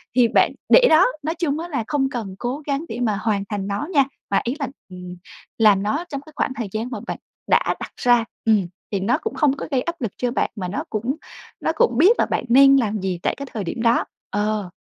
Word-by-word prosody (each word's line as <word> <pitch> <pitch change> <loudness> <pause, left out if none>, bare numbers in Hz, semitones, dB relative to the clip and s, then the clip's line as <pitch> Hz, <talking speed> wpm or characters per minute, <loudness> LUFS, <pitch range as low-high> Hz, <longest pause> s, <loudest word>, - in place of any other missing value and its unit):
thì 250 -2 +5
bạn - - +3 0.2
để - - +7
đó. 320 +4 +6 0.2
Nói 320 +3 -2
chung 315 -3 -1
á 335 - -5
là 275 -8 -2
không 275 -3 0
cần 220 -8 -5
cố 255 +5 -3
gắng 285 +3 -1
để - - -5
mà 215 -4 0
hoàn 210 -3 0
thành 205 -2 -3
nó 205 +9 -3
nha. 280 -3 +6 0.3
Mà 200 - +2
ý 245 +3 -2
là, 280 - -1 0.2
ừm, 180 -1 -9 0.4
làm 210 -3 +5
nó 290 +12 -1
trong 280 -3 -4
cái 310 +2 -16
khoảng - - 0
thời 235 -5 -3
gian 220 +4 -3
mà - - -4
bạn - - -3 0.3
đã - - +3
đặt - - -7
ra. 240 -2 +4 0.2
Ừm, 210 -5 +3 0.2
thì 200 - 0
nó 230 +8 +1
cũng 445 +7 -4
không 285 -3 +2
có - - -5
gây 260 -2 +2
áp 335 +2 -5
lực 225 -5 -2
cho 245 -1 -1
bạn - - 0
mà 190 -5 -4
nó 185 - -3
cũng 235 +6 -2 0.4
nó - - 0
cũng 240 -6 +2
biết 380 - +5
là - - +4
bạn - - -2
nên 275 +2 +7
làm 215 -4 0
gì 185 -2 -2
tại - - +1
cái 280 - -5
thời 215 -4 -3
điểm 190 +6 -4
đó. 235 0 +3 0.2
Ờ, 205 -1 -1
240 Hz, 250 wpm, -22 LUFS, 205-280 Hz, 0.4 s, để